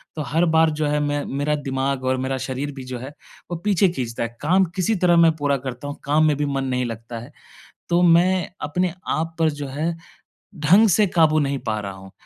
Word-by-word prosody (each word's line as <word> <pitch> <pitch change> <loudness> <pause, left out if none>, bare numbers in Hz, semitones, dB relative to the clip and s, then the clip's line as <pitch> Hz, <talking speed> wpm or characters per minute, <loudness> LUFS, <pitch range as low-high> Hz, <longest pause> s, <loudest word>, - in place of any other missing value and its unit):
तो 155 - -3
हर 155 +5 +1
बार 160 0 +5
जो 155 - +1
है 150 0 +1
मैं 145 0 -1
मेरा 145 +2 -1
दिमाग़ 135 -1 -2
और 130 0 +1
मेरा 130 +1 -2
शरीर 135 +2 -3
भी 135 - -7
जो 130 0 -6
है, 135 +4 -8 0.4
वो 175 - -2
पीछे 195 -2 +3
खींचता 120 -9 -4
है। 115 0 -6
काम 185 +5 +3
किसी 195 +4 +1
तरह 175 -2 +3
मैं 165 -1 +6
पूरा 145 -2 0
करता 125 +3 -6
हूँ, 145 - -6
काम 150 +2 +3
में 150 - +2
भी 150 - 0
मन 135 -1 -1
नहीं 125 -1 -1
लगता 115 0 -6
है। 120 +6 -11 0.6
तो 175 0 +3
मैं 175 +1 +4 0.2
अपने 180 +2 -1
आप 165 +1 -2
पर 160 -1 +3
जो 140 - -3
है, 155 +5 -2 0.6
ढंग 190 +9 +5
से 205 +3 +4
काबू 160 -3 +3
नहीं 140 -2 -1
पा 110 -1 0
रहा 100 -1 -5
हूँ। 95 0 -13
145 Hz, 225 wpm, -22 LUFS, 130-165 Hz, 0.6 s, मैं